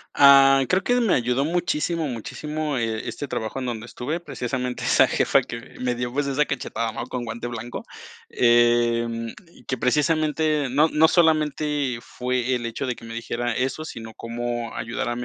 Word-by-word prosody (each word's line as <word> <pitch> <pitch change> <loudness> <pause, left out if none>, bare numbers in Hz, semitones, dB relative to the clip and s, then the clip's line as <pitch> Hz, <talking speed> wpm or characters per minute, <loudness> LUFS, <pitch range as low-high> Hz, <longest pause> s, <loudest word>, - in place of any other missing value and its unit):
Ah, 135 -1 +7
creo 185 +1 +2
que 245 +4 +2
me 225 -5 +3
ayudó 125 +2 +1
muchísimo, 165 -1 -1
muchísimo, 150 +5 -4
eh, 115 -2 -2
este 130 +4 -5
trabajo 110 +4 -3
en 130 - -3
donde 115 -1 -4
estuve. 150 +8 -4
Precisamente, 125 -5 -4
esa - - +5
jefa - - +3
que 115 +2 -9
me 125 -1 -1
dio, 120 0 -3
pues, 145 +1 0
esa 140 +2 +2
cachetada, 115 -4 -3
¿no? 110 - -5
Con 125 -1 -4
guante 115 +1 -5
blanco, 120 0 -6 0.4
em, 120 -1 +2 0.2
y - - -19
que 130 - -2
precisamente 150 +1 +1
no 145 +5 +3
no 155 +1 +5
solamente 150 -6 +1
fue 125 0 -1
el 120 -1 -4
hecho 125 +4 -4
de 125 - -2
que - - -13
me 115 - -8
dijera 120 +1 -2
eso, 135 +5 -2
sino 115 -6 -8
cómo 120 0 -4
ayudarme 115 +1 -3
125 Hz, 175 wpm, -24 LUFS, 120-150 Hz, 0.4 s, Ah